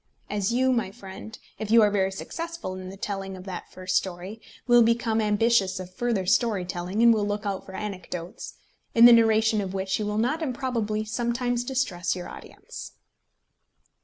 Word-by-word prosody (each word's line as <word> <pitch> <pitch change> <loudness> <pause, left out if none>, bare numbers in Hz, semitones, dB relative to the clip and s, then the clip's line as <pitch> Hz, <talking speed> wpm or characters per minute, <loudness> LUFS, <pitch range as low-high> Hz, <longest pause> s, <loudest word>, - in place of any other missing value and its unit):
As 205 0 0
you, 260 +2 +2
my 230 -6 0
friend, 200 +1 -10 0.2
if 215 - -4
you 225 0 +7
are 210 - +4
very 195 -1 +1
successful 335 - -6
in 185 0 -7
the 195 - -10
telling 195 -1 -4
of 185 - -10
that 185 -2 -7
first 185 0 -4
story, 190 +4 -4 0.2
will 240 -1 +6
become 230 -1 +2
ambitious 210 -2 +2
of 185 0 -8
further 225 -2 -1
story 205 -1 +2
telling, 180 +4 -2
and 235 -1 +8
will 215 -2 0
look 205 +1 -3
out 195 -2 -3
for 190 - -9
anecdotes, 185 -4 -6 0.4
in 230 0 +8
the 240 - +10
narration 220 -1 +4
of 195 -1 -5
which 190 +1 -1
you 210 - -2
will 210 0 -2
not 250 +9 0
improbably 235 -6 -2
sometimes 240 +2 -1
distress 245 -10 -1
your 180 - -6
audience. - - -10
210 Hz, 180 wpm, -26 LUFS, 190-235 Hz, 0.4 s, the